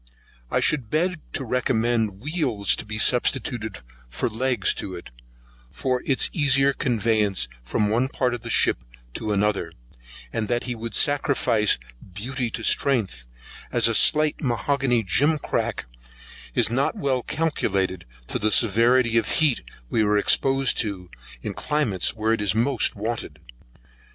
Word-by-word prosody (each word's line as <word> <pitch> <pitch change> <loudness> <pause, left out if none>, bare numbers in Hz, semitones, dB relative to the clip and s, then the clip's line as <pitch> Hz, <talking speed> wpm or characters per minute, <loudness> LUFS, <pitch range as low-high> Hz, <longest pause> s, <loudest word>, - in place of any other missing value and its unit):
I - - +1
should 135 -8 +1
beg 170 +2 0
to 135 - -3
recommend 115 -4 0
wheels 135 - +1
to - - -7
be 110 0 -4
substituted 120 - +1 0.3
for - - -2
legs 120 -2 +1
to 95 - -6
it, 85 - -10 0.6
for 125 - -2
its 135 - +3
easier 140 -3 +3
conveyance 110 - +1
from 80 +12 -1
one 120 +4 +1
part 125 -2 -1
of 120 - -5
the 115 - -7
ship - - +2 0.3
to 110 - -4
the 105 0 +2
other, 100 -5 -1 0.6
and 110 -2 -2
that 120 +2 0
he 125 - -3
would 115 0 -6
sacrifice 140 -7 +2 0.4
beauty 125 +3 -3
to 115 - -5
strength, 100 - 0 0.4
as - - +3
a - - +1
slight 155 0 +2
mahogany 125 -1 0
jim 145 - +2
crack 145 - -2 0.7
is 110 - +2
not 135 +4 0
well 130 -3 0
calculated 95 - -1 0.2
to - - -3
the 110 - +1
severity 115 +2 +4
of 110 - -4
heat 155 -6 +2 0.3
we 115 - +2
are 105 -1 +2
exposed 135 +5 +2
to, 95 -5 -3 0.3
in - - -4
climates 130 -13 0
where 110 0 +1
it 115 - -1
is 105 0 +1
most 120 +1 +1
wanted. 110 +3 -4
115 Hz, 150 wpm, -24 LUFS, 105-135 Hz, 0.7 s, severity